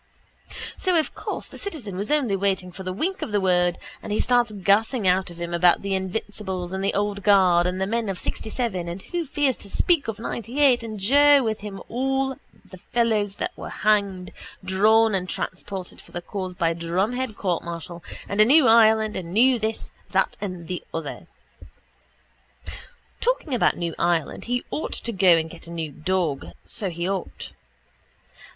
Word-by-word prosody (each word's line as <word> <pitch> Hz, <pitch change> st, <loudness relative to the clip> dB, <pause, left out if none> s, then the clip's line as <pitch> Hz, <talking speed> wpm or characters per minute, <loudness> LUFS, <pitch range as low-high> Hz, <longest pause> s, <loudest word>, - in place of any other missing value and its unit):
_ -, -, -13 dB, 0.2 s
So 365 Hz, -3 st, +2 dB
of 315 Hz, -, 0 dB
course -, -, -5 dB
the -, -, -11 dB
citizen 285 Hz, -, -5 dB
was 200 Hz, +3 st, -3 dB
only 280 Hz, -9 st, +2 dB
waiting 190 Hz, -2 st, 0 dB
for 180 Hz, -, -9 dB
the 185 Hz, -1 st, -4 dB
wink 350 Hz, -, -2 dB
of -, -, -4 dB
the 205 Hz, -, +2 dB
word 180 Hz, -2 st, +2 dB, 0.2 s
and -, -, -7 dB
he 210 Hz, -, 0 dB
starts 245 Hz, -2 st, +3 dB
gassing 205 Hz, +3 st, +2 dB
out 185 Hz, +1 st, +2 dB
of 170 Hz, -1 st, -11 dB
him 170 Hz, 0 st, -4 dB
about 175 Hz, +1 st, +4 dB
the 200 Hz, -1 st, -1 dB
invincibles 190 Hz, -1 st, -3 dB
and 190 Hz, 0 st, -3 dB
the 195 Hz, -, 0 dB
old 205 Hz, 0 st, -1 dB
guard 185 Hz, -4 st, +5 dB
and 180 Hz, +1 st, -2 dB
the 190 Hz, -, +1 dB
men 225 Hz, +1 st, -1 dB
of 190 Hz, -, -3 dB
sixtyseven 215 Hz, -6 st, -3 dB
and 175 Hz, +3 st, -6 dB
who 345 Hz, -1 st, -3 dB
fears 280 Hz, -2 st, +1 dB
to 200 Hz, -, -11 dB
speak 335 Hz, -, +2 dB
of 225 Hz, -2 st, -3 dB
ninetyeight 245 Hz, +3 st, +1 dB
and 220 Hz, -2 st, -6 dB
Joe 285 Hz, +6 st, +6 dB
with 220 Hz, -2 st, -1 dB
him 205 Hz, -1 st, -7 dB
about -, -, -10 dB
all 265 Hz, +2 st, 0 dB, 0.3 s
the 185 Hz, -, -13 dB
fellows 215 Hz, -2 st, 0 dB
that -, -, -4 dB
were -, -, -7 dB
hanged, 200 Hz, -3 st, 0 dB, 0.3 s
drawn 215 Hz, +4 st, +4 dB
and 185 Hz, -1 st, -1 dB
transported 185 Hz, 0 st, -5 dB
for -, -, -19 dB
the 175 Hz, -, -4 dB
cause 185 Hz, -2 st, -5 dB
by 165 Hz, -2 st, +1 dB
drumhead 200 Hz, +9 st, -1 dB
courtmartial 170 Hz, -2 st, -3 dB, 0.3 s
and 200 Hz, +1 st, +2 dB
a -, -, +8 dB
new 280 Hz, +2 st, +6 dB
Ireland 220 Hz, -1 st, +5 dB
and 170 Hz, -2 st, -5 dB
new 245 Hz, +5 st, +4 dB
this, 220 Hz, 0 st, -3 dB, 0.2 s
that -, -, +1 dB
and 180 Hz, -5 st, -5 dB
the 180 Hz, -1 st, -4 dB
other. 165 Hz, -3 st, -6 dB, 1.9 s
Talking 480 Hz, -, 0 dB
about 245 Hz, -, +2 dB
new 170 Hz, -1 st, -2 dB
Ireland 170 Hz, -3 st, 0 dB
he 245 Hz, +1 st, -1 dB
ought 310 Hz, -, -3 dB
to 235 Hz, -, -4 dB
go 185 Hz, -4 st, +5 dB
and 160 Hz, 0 st, -1 dB
get 165 Hz, 0 st, -11 dB
a -, -, -9 dB
new 165 Hz, -3 st, -4 dB
dog 160 Hz, -2 st, -2 dB
so 200 Hz, -, -3 dB
he 170 Hz, +1 st, -3 dB
ought. 190 Hz, -2 st, -4 dB
200 Hz, 185 wpm, -24 LUFS, 180-230 Hz, 1.9 s, a